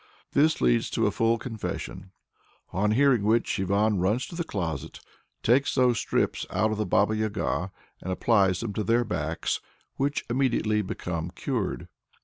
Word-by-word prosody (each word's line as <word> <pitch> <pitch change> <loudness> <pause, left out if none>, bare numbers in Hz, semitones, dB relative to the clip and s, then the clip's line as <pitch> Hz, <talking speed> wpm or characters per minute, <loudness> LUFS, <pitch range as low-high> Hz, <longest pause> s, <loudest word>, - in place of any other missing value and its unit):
This 155 +3 +3
leads - - +3
to - - 0
a - - +2
full 115 +1 +2
confession, 110 -5 -6 0.6
on 100 +3 +1
hearing 135 -2 +4
which 110 0 +1
Ivan 100 +2 +2
"runs 105 +8 +1
to 170 - -9
the 170 - -1
closet, 90 - -4 0.4
takes 130 +5 +3
those 125 -3 +3
strips - - 0
out 110 0 +1
of 110 - -2
the 105 - 0
Baba 100 +4 +3
Yaga, 105 -3 -1 0.3
and 95 - -4
applies 95 -2 +2
them 115 -3 -3
to 105 - -2
their 115 +4 +3
backs," 80 -7 -2 0.4
which 140 +2 -1
immediately 120 -4 +1
become 90 -3 -4
cured. 95 -2 -3
110 Hz, 155 wpm, -27 LUFS, 95-120 Hz, 0.6 s, hearing